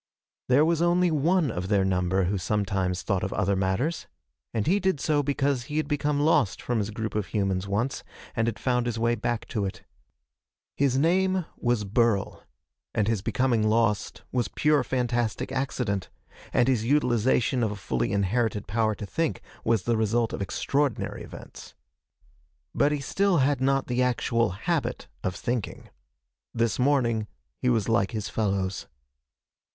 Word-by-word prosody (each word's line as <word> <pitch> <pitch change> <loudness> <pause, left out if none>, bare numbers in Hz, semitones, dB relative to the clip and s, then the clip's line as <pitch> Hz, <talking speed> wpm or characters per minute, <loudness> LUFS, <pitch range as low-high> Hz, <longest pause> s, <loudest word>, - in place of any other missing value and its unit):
There 140 +5 +5
was 165 0 +1
only 175 0 +3
one 160 +1 +2
of 90 +1 -4
their 100 -1 +2
number 95 0 +1
who 95 +2 0
sometimes 95 -2 -1
thought 95 0 0
of 95 - -2
other 100 0 +1
matters, 95 - -1 0.4
and 110 -3 -1
he 195 +5 +3
did 190 -6 0
so 150 -1 +2
because 140 -2 0
he 150 +3 -4
had 155 - 0
become 145 -1 0
lost 145 - +2
from 120 -2 -1
his 105 0 -2
group 110 0 -4
of 105 -2 -1
humans 95 -2 -1
once, 115 +7 -1 0.3
and 115 -1 +1
had 115 - -1
found 125 -2 0
his 120 -2 -2
way 115 +1 +2
back 120 0 -2
to 105 - -1
it. 95 - -5 0.9
His 135 -2 +2
name 185 +4 +2
was 120 -3 0
Burl, 105 0 +1 0.5
and 105 - +1
his 110 -3 0
becoming 115 -1 +1
lost 110 -2 0
was 120 -4 0
pure 150 -3 +2
fantastic 120 -4 -1
accident, 120 - -2 0.4
and 120 - +3
his 125 -5 +2
utilization 125 -2 +2
of 110 - +1
a - - -4
fully 65 -11 -2
inherited 105 +2 0
power 110 +1 0
to 105 - -6
think 165 +10 -1 0.2
was 110 -4 +2
the 115 -1 +1
result 110 +1 +1
of - - -4
extraordinary 135 +6 -1
events. - - -11 1.0
But 145 +1 +3
he 145 -1 -1
still 195 +6 +1
had 140 -1 +2
not 135 0 +2
the 125 0 0
actual 120 -2 +1 0.2
habit - - -1 0.2
of 95 - -1
thinking. 120 -4 -4 0.7
This 115 +1 +1
morning 120 -5 +2 0.3
he 125 - +1
was 115 -4 +1
like 115 -4 +2
his 105 -4 -3
fellows. 95 -2 -1
115 Hz, 165 wpm, -26 LUFS, 105-135 Hz, 1.0 s, There